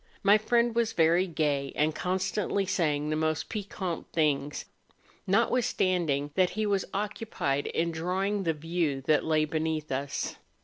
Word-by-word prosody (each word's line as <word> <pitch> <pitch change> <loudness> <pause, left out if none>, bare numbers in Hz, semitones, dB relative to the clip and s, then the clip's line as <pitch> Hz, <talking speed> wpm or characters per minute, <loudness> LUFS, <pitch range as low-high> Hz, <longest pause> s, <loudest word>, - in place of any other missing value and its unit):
My 205 +2 +6
friend 235 +1 +2
was 230 -1 +1
very 170 +3 +3
gay, 145 -4 -1
and 155 +1 +2
constantly 190 +3 -1
saying 150 -5 0
the - - +1
most 155 0 -1
piquant 195 -5 -4
things, 150 -3 0 0.6
notwitlistanding 185 - +1
that 185 +2 +3
he 215 0 -2
was 200 -2 +1
occupied 200 -9 -2
in 170 +1 0
drawing 190 +5 -1
the 165 -3 0
view 160 -2 -1
that 150 +3 +2
lay 155 -1 +2
beneath 155 -1 -2
us. 140 +2 -3
165 Hz, 140 wpm, -28 LUFS, 150-195 Hz, 0.6 s, My